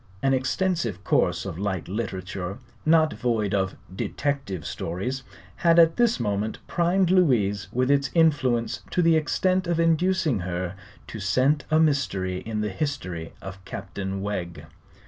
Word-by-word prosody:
An 135 0 +3
extensive 130 - 0
course - - +1
of 80 - -5
light 95 -4 -2
literature, 95 -2 -4 0.3
not 160 -1 +5
void 110 -5 -1
of 95 -1 0 0.2
"detective 135 - -2
stories," 120 +11 -3 0.4
had 170 -1 +4
at 165 -1 +6
this 240 -1 +3
moment 105 -1 -1
primed 175 +1 +2
Louise 115 - +3
with 130 +2 +1
its 140 -1 +2
influence 140 -8 +2
to 180 - +1
the 165 -1 +5
extent 185 +4 +1
of 170 -1 0
inducing 165 - +2
her 90 0 -3 0.3
to - - -8
scent 130 +10 +2
a 155 - +4
mystery 100 - +1
in 110 0 -3
the 105 -1 -2
history 95 - -4
of 95 0 -8
Captain 95 +1 -5
Wegg. 85 -6 -4
120 Hz, 145 wpm, -25 LUFS, 95-160 Hz, 0.4 s, at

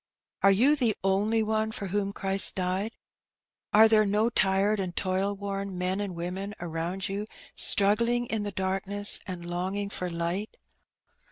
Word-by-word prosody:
Are 195 - +6
you 245 +10 +4
the 240 -7 +1
only 205 +4 +1
one 220 0 -1
for 200 -3 -5
whom 200 +1 -1
Christ 195 0 +1
died? 190 +4 -2 0.8
Are 220 +1 +7
there 220 -1 +4
no 210 +3 +1
tired 200 +1 +2
and 180 -3 -4
toil 190 +2 -1
worn 195 -1 -5
men 185 +2 -1
and 195 -3 -4
women 185 +4 -5
around 170 +3 -4
you 200 +2 -4 0.3
struggling 230 +4 +3
in 220 -2 -2
the 205 0 -4
darkness 195 +2 +1
and 180 -2 -6
long 175 +3 -3
ing 200 0 -3
for 180 -2 -3
light? 170 +5 -3
195 Hz, 160 wpm, -27 LUFS, 185-210 Hz, 0.8 s, Are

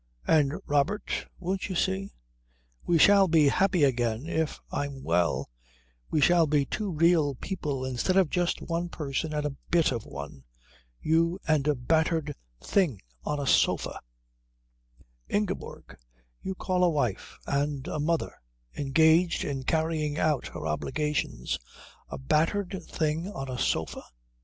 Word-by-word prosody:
And, 145 -3 +3
Robert, 145 +9 0
won't 190 +3 -3
you 185 - -3
see? 190 +2 0 0.8
We 170 - +4
shall 200 +3 +6
be 155 -4 +5
happy 185 0 +2
again 120 -2 +1
if 160 -2 -2
I'm 140 -2 -4
well, 75 -8 0 0.6
we 155 - +1
shall 170 +1 +5
be 145 -1 +2
two 210 +8 -3
real 160 -4 +3
people 145 -5 -4
instead 130 +9 0
of 185 -6 +3
just 175 -1 0
one 170 +1 -2
person 150 0 -3
and 150 -1 -2
a 145 -2 -3
bit 170 -4 +3
of 115 -4 -4
one 70 -1 -8 0.6
you 165 +3 +2
and 155 -3 +2
a 150 - +3
battered 155 +3 +1 0.3
thing 170 - +1 0.3
on 150 - -1
a 140 - -2
sofa - - +2 0.7
" - - -34
"Ingeborg, 205 -2 -4 0.5
you 190 - -4
call 180 -1 0
a 180 - +5
wife 125 - -2
and 140 -1 -1
a - - -3
mother 165 +2 0 0.4
engaged 160 +5 +3
in 140 -2 -3
carrying 155 -2 0
out 155 -5 +1
her - - -7
obligations 135 - -2 0.5
a - - -5
battered 175 +7 0
thing 160 +2 -1
on 135 -7 -6
a 125 - -4
sofa?" - - -1
155 Hz, 140 wpm, -28 LUFS, 135-170 Hz, 0.8 s, shall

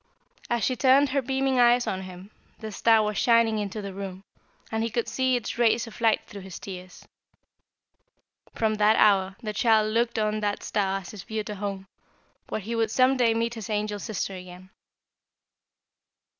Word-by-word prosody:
"As 235 -1 0
she 255 - +1
turned 270 +3 +4
her 275 +1 +1
beaming 265 0 0
eyes 240 0 +5
on 190 - -2
him, 185 +2 -10 0.3
the 220 -1 -7
star 220 +1 +4
was 210 -1 -1
shining 230 -2 +3
into 205 0 -4
the 200 -1 -6
room, 195 -1 -7 0.5
and 220 0 -1
he 230 - -1
could 235 +1 -2
see 260 -1 +1
its 240 0 -4
rays 235 0 +3
of 230 0 -12
light 225 -2 +2
through 200 - -10
his 190 -2 -9
tears. 185 -2 -10 1.5
From 220 -1 +1
that 215 +1 +4
hour 190 -2 +3
the 215 -1 -3
child 215 -1 +3
looked 235 0 +1
on 215 0 0
that 205 -1 -2
star 195 -2 -1
as 180 - -10
his 210 - -9
future 215 0 -4
home, 200 -1 -5 0.6
where - - -3
he 230 +4 -4
would 225 -1 +1
some 255 +4 +3
day 235 -3 +2
meet 230 +1 -1
his 225 -3 -7
angel 210 -1 -2
sister 200 -2 -4
again. 185 0 -11
215 Hz, 180 wpm, -26 LUFS, 200-235 Hz, 1.5 s, eyes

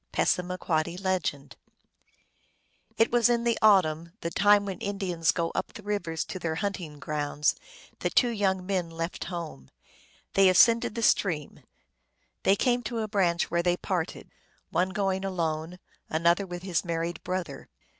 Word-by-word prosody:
(Passamaquoddy.) 175 -2 0 2.0
It 225 - +3
was 240 0 +4
in 235 -1 +2
the 235 -1 +1
autumn, 170 -6 +3
the 170 - -3
time 205 +2 +4
when 195 -2 -5
Indians 190 -5 0
go 170 -1 -2
up - - -3
the 210 - -10
rivers 180 -6 -2
to 185 - -6
their 160 -2 -2
hunting 180 -5 -4
grounds, 150 0 0 0.5
that - - -2
two 245 -2 +4
youn^ 190 -3 0
men 185 -3 -1
left 165 +1 -4
home. 165 - -7 0.6
They 195 -1 +6
ascended 230 +4 +5
the 230 - -2
stream; 160 -9 +1 0.8
they 195 - +4
came 245 +3 +1
to 235 +1 -4
a 220 -1 -1
branch, 185 -5 +1
where 170 0 +2
they 175 0 +1
parted: 180 -4 -3 0.4
one 180 +3 +1
going 190 -1 -1
alone, 170 -2 -2 0.3
an 160 +2 -2
other 175 +3 +3
with 175 0 -7
his 185 -4 0
married 170 0 -3
brother. 180 -7 -4
180 Hz, 150 wpm, -27 LUFS, 165-200 Hz, 2.0 s, They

